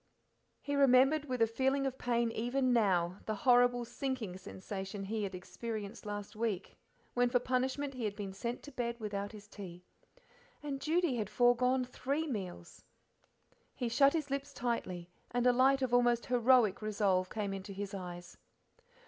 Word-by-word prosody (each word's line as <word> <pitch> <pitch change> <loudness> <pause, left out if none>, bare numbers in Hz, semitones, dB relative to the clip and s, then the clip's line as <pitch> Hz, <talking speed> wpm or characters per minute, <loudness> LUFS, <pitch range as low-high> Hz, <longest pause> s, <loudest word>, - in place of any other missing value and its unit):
He 285 - -3
remembered, 275 +2 +5
with 255 -4 +1
a - - +6
feeling 265 +4 +1
of 265 -1 -3
pain 235 -1 +1
even 250 +3 +1
now, 185 -5 +2
the 215 - -1
horrible 245 +1 +4
sinking 250 -7 -3
sensation 190 +1 -6
he 215 +2 -2
had 195 -2 -3
experienced 215 +3 -6
last 205 0 -5
week 215 -4 -2 0.4
when 245 0 +3
for 245 - +3
punishment 260 +3 -1
he 250 -3 -4
had 205 -1 -2
been 200 -2 -5
sent 235 +5 -4
to 290 - -10
bed 235 -2 -3
without 205 -2 -3
his 210 -1 -12
tea. 180 -4 -9 0.8
And 275 -2 -4
Judy 320 -4 +1
had 210 -3 -2
forgone 250 +2 +3
three 280 +5 -2
meals! 185 - -6 0.9
He 245 -3 -2
shut 275 +4 +5
his 305 -4 -2
lips 280 +1 -3
tightly, 185 -8 -3 0.2
and 245 +1 0
a 250 - +6
light 265 +2 +4
of 250 -2 -1
almost 240 -1 +3
heroic 245 -4 +4
resolve 200 -4 +1
came 205 -2 -3
into 195 +1 -6
his 200 +1 -5
eyes. 175 -2 -7
235 Hz, 165 wpm, -33 LUFS, 200-255 Hz, 0.9 s, a